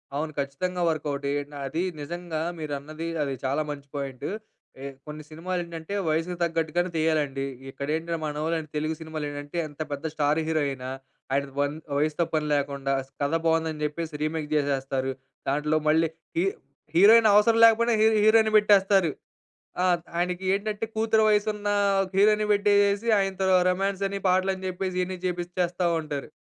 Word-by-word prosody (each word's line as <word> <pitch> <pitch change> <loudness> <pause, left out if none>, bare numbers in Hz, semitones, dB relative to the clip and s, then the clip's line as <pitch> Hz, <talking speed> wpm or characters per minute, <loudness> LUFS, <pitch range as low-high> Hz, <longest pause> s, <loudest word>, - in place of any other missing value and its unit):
అవును. 155 +1 -2
ఖచ్చితంగా 175 +7 -2
వర్కౌటే 145 -3 -2 0.4
అది 165 +6 -2 0.2
నిజంగా 170 +1 -4 0.2
మీరన్నది 155 +2 -5 0.2
అది 140 -1 -2
చాలా 140 +4 +1
మంచి 140 -1 -8
పాయింటు. 135 -3 -4 0.5
ఏ - - -5 0.2
కొన్ని 150 0 -7
సినిమాలేంటంటే 170 +1 -5 0.2
వయసుకు 165 +3 0
తగ్గట్టుగానే 165 +1 0
తీయాలండి. 150 -4 0 0.2
ఇక్కడేంటి 160 +5 -3
మనోళ్ళు 155 +2 -1 0.2
తెలుగు 155 +1 -1
సినిమాలేంటంటే 150 -1 -6
ఎంత 150 +1 -10
పెద్ద 145 +3 -5
స్టార్ 150 0 +1
హీరో 160 -1 +1
ఆయిన, 130 -2 -5 0.5
ఆయన 140 0 0
వన్ 145 +1 0 0.2
వయసుతో 155 +3 +1
పనిలేకుండా 140 -3 0 0.3
కథ 140 +3 0
బావుందని 160 -2 +1
చెప్పేసి 150 0 -4
రీమేక్ 155 -1 -2
జేసేస్తారు. 135 -2 0 0.4
దాంట్లో 150 +2 +1
మళ్ళీ 160 +1 +4 0.3
హీ 180 - +3 0.5
హీరోయిన్ 220 +4 +7
అవసరం 225 +2 +5
లేకపోయినా 230 +1 +4
హీ 220 - +6 0.2
హీరోయిన్‌ని 220 0 +5
పెట్టేస్తారు. 195 -5 +4 0.7
ఆ! - - +3 0.3
ఆయనకేంటంటే 190 +4 -1
కూతురు 220 0 +2
వయసున్న 210 0 +1 0.5
హీరోయిన్‌ని 210 +1 +4
పెట్టేసేసి 205 +1 +3
ఆయన‌తో 195 -1 0 0.2
రొమాన్స్ 195 +1 -1
అని 200 0 -3
పాటలు 185 +1 +3
అని 190 0 -7
చెప్పేసి 185 0 -3
ఇయన్ని 185 0 -4
చేపిచ్చేస్తా 175 0 -1
ఉంటారు. 145 -3 -5
165 Hz, 130 wpm, -26 LUFS, 150-190 Hz, 0.7 s, హీరోయిన్